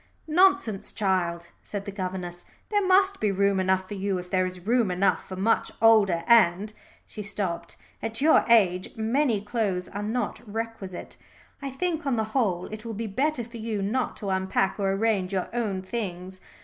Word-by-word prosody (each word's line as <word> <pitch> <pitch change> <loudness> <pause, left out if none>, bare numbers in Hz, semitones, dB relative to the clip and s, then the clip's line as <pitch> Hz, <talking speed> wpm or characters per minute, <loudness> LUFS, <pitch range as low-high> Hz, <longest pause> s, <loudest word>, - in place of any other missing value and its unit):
"Nonsense, 315 - +3
child," 175 -4 -1
said 200 -1 -6
the 200 - -5
governess. 185 -2 -5 0.3
"There 415 -1 +2
must 385 +1 +3
be 210 -2 +1
room 200 0 +2
enough 190 0 +1
for 205 - -6
you 195 -1 -1
if 180 0 -8
there 185 -1 +2
is 180 0 -9
room 235 -2 +2
enough 180 -1 +1
for 190 - -5
much 200 +5 +1
older 210 -7 +5
and 215 -3 +4 0.2
" - - -28
she 215 - -8
stopped. 195 -4 -4 0.2
"At 225 0 -3
your 310 +3 +5
age 185 -6 +3
many 230 0 +1
clothes 205 -4 -2
are 205 - -5
not 220 +2 -2
requisite. 225 -5 -6 0.4
I 275 - -4
think, 320 +2 -2
on 265 - +2
the 220 - +1
whole, 190 -9 +1
it 215 0 -7
will 230 -2 -5
be 225 +3 -3
better 260 +6 -1
for 230 +1 -10
you 220 -3 -3
not 240 +6 -1
to 200 -3 -3
unpack 190 +1 0
or 195 -1 +1
arrange 195 -2 0
your 185 -2 -1
own 210 -6 -2
things. 185 -3 -5
205 Hz, 185 wpm, -26 LUFS, 185-230 Hz, 0.4 s, older